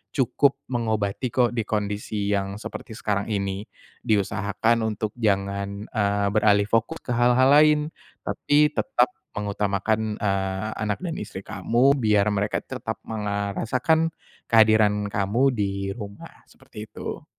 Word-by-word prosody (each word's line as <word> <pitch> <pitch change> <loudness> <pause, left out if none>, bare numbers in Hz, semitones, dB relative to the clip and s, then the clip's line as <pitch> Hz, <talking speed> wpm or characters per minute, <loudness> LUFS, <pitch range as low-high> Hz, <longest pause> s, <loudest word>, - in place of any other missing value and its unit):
cukup 140 +1 +2
mengobati 110 0 -1
kok, 125 -2 +2
di 115 - +1
kondisi 105 -1 -2
yang 100 0 -2
seperti 110 - -7
sekarang 100 -3 -1
ini. 100 -1 -2 0.4
Diusahakan 105 +2 +1
untuk 110 0 -2
jangan, 100 -1 -1
eee, 100 -2 0
beralih 105 -1 +3
fokus 115 +9 +1
ke - - -13
hal-hal 125 +2 +4
lain. 150 0 +6 0.5
Tapi 150 +1 +2
tetap 270 - +2 0.3
mengutamakan, 105 +1 -1
eee, 95 0 -1
anak 105 -1 -1
dan 170 -3 -3
istri 95 - -7
kamu, 125 +4 +2
biar 105 -2 +3
mereka 105 +1 0
tetap - - -5
meng 110 -2 -4
eee, 100 0 -1
rasakan 160 +7 +1 0.4
kehadiran 110 -2 +4
kamu 115 +6 +2
di 100 -3 -2
rumah, 100 -3 -10
seperti 105 0 -11
itu. - - -7
105 Hz, 130 wpm, -24 LUFS, 100-120 Hz, 0.5 s, lain